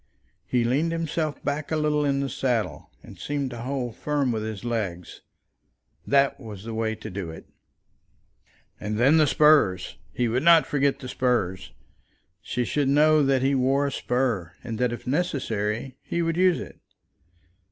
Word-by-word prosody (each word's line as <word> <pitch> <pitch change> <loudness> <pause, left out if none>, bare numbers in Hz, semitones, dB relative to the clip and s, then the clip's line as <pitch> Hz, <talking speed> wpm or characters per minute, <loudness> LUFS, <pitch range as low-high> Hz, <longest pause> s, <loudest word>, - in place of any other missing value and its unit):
He 125 -2 +1
leaned 140 +8 +1
himself 160 -2 -2
back 145 +2 -2
a - - +1
little 150 -1 +1
in 140 -1 +1
the 140 - -1
saddle, 115 - -2
and - - -13
seemed 140 -3 -3
to 120 - -7
hold 125 -2 -3
firm 145 -4 0
with 110 -2 -2
his 110 -1 -5
legs. 100 -7 -4 0.9
That 140 0 +3
was 105 -6 -9
the 115 0 -6
way 110 0 -1
to 110 -1 -9
do 90 -3 -5
it. 80 - -10 1.3
And 105 +1 -3
then 135 +7 +5
the 155 -2 +5
spurs! 140 -13 +3
He 125 - 0
would 120 +3 0
not 170 +1 +6
forget 140 -1 +1
the 130 - -9
spurs. 95 - -1 0.7
She 120 +3 -2
should 145 +2 0
know 155 +2 +5
that 135 -2 +2
he 135 +1 +2
wore 135 +2 +2
a 140 - -1
spur, 120 -12 -1
and 115 -3 -5
that, 125 -1 +1
if 120 - -7
necessary, 125 - -2
he 170 - -2
would 165 0 0
use 180 -1 +3
it. - - -9
130 Hz, 170 wpm, -25 LUFS, 110-145 Hz, 1.3 s, not